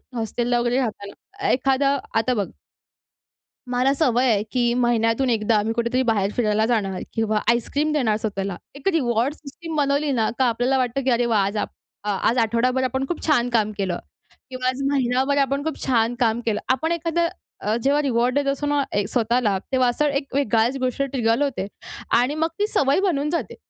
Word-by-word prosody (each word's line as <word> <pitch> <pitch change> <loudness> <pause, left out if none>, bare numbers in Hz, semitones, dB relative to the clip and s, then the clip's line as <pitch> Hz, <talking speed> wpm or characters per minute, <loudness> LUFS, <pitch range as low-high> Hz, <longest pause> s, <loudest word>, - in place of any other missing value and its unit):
हॉस्टेलला 240 +1 -1
वगैरे 240 +1 +1
राहताना 260 - -4
एखादा 275 +2 +2 0.2
आता 240 +3 +2
बघ. 205 -3 -2 1.2
मला 250 +2 +2
सवय 260 -4 +2
आहे, 205 -2 +1
की 240 -2 +1
महिन्यातून 240 +1 +1
एकदा 220 -2 +2
मी 225 +1 -1
कुठेतरी 235 +2 0
बाहेर 210 -4 +1
फिरायला 215 -2 +2
जाणार 205 -5 -1
किंवा 220 -1 0
आईसक्रीम 285 +6 +1
देणार 235 -8 +1
स्वतःला. 195 -4 -3 0.2
एक 280 +6 -7
रिवार्ड 245 -3 +1
सिस्टम 320 +3 -9
बनवली 285 0 +1
ना, 225 -4 +1
का 260 - +4
आपल्याला 245 +3 +1
वाटतं, 255 +1 -1
की 265 - +1
"अरे 240 0 +2
वाह! 220 -4 +2
आज 200 +2 -3
आपण 210 - -3 0.4
आज 205 +5 +1
आठवडाभर 240 +3 +1
आपण 265 +1 -1
खूप 345 - -4
छान 245 -6 +3
काम 220 -3 +1
केलं 185 -3 -2 0.5
किंवा 255 0 -3
आज 255 +1 -1
महिनाभर 265 +1 +1
आपण 275 0 +1
खूप 320 - -2
छान 235 -3 +2
काम 230 -2 +2
केलं. 215 -2 0
आपण 290 +6 0
एखादं 335 0 0 0.4
अ, 210 +1 +1
जेव्हा 285 +2 +3
रिवार्ड 250 -2 +1
देत 285 0 +1
असतो 280 +1 -3
ना 290 0 +2 0.3
स्वतःला, 230 -4 +1
तेव्हा 255 -1 +3
असा 295 +5 +1
एक 275 -2 -6
वेगळाच 240 -1 +2
गोष्ट 255 +2 -1
ट्रिगर 245 -2 0
होते, 270 -9 -1 0.5
आणि 255 +5 0
मग 320 +1 +1
ती 415 - +2
सवय 280 -4 +2
बनून 300 -7 0
जाते. 340 +1 -3
250 Hz, 180 wpm, -23 LUFS, 225-275 Hz, 1.2 s, का